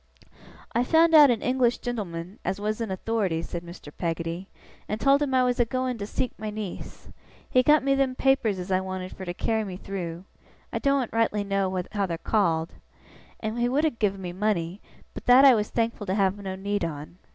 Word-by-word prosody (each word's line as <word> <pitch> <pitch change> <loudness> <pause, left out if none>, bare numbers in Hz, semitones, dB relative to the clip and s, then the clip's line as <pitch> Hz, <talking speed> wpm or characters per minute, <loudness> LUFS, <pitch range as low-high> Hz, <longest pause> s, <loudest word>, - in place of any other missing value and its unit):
'I 235 - +2
found 325 +3 +4
out 300 -3 +9
an 235 -3 0
English 250 -1 +2
gen'leman 195 -6 -5
as 195 - -2
was 215 +2 -2
in 225 - -2
authority,' 190 -4 -1
said 170 +1 -6
Mr. 170 -3 -11
Peggotty, 165 +2 -3 0.4
'and 210 - -2
told 275 +5 +4
him 275 -3 0
I 255 - +4
was 250 0 0
a - - +6
going 255 0 -2
to 200 - -4
seek 250 +2 -2
my 215 0 -4
niece. 210 -3 -7 0.4
He 255 - +4
got 300 +3 +4
me 275 0 +2
them 270 -1 +1
papers 255 -7 +2
as 180 +1 -5
I 185 - +3
wanted 185 -1 -6
fur 190 - -8
to 175 - -4
carry 220 +3 0
me 190 -3 -6
through 180 -3 -6 0.5
I - - -1
doen't 275 -4 +1
rightly 225 -2 +1
know 195 -2 -1
how 200 -2 -1
they're 170 -2 -3
called 165 -5 0 0.7
and 220 +2 -3
he 240 0 +2
would 280 +5 +1
have 305 -7 0
give 200 -2 +1
me 180 -2 -6
money, 190 -2 -1 0.3
but - - -10
that 255 +3 +8
I 270 - +9
was 210 -2 0
thankful 230 -3 -2
to 190 - 0
have 195 -2 +2
no 195 -2 -6
need 205 +2 -2
on. 155 +2 -6
210 Hz, 210 wpm, -26 LUFS, 185-245 Hz, 0.7 s, out